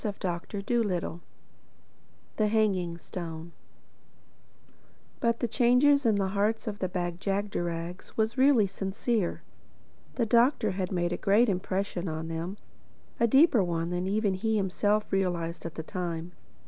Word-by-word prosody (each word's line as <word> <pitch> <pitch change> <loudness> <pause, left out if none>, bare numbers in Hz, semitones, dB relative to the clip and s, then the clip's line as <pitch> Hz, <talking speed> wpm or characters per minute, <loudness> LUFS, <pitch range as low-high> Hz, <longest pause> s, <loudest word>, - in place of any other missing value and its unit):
THE - - -2
EIGHTH 205 - -5
CHAPTER 190 0 -2 1.2
THE 215 - +3
HANGING 195 -6 +1
STONE 170 -1 -7 1.7
BUT 235 0 +1
the 240 - 0
change 250 +3 +3
of 280 -7 +4
heart 200 +3 0
in 210 - -2
the 185 - 0
Bag 175 -1 -3
jagderags 180 -3 -3
was 220 +1 +1
really 260 -5 +5
sincere. 195 +1 -2 0.7
The 235 - +1
Doctor 235 -1 +3
had 185 0 -3
made 175 -1 0
a - - -2
great 215 +4 +3
impression 190 -1 -2
on 160 0 -4
them—a 180 +6 -5
deeper 265 - +5
one 170 -1 -2
than 180 +1 -2
even 205 0 +1
he 220 +3 0
himself 205 +2 +1
realized 175 -3 -1
at 165 - -10
the 160 - -5
time. 170 -1 -4
195 Hz, 135 wpm, -28 LUFS, 175-220 Hz, 1.7 s, really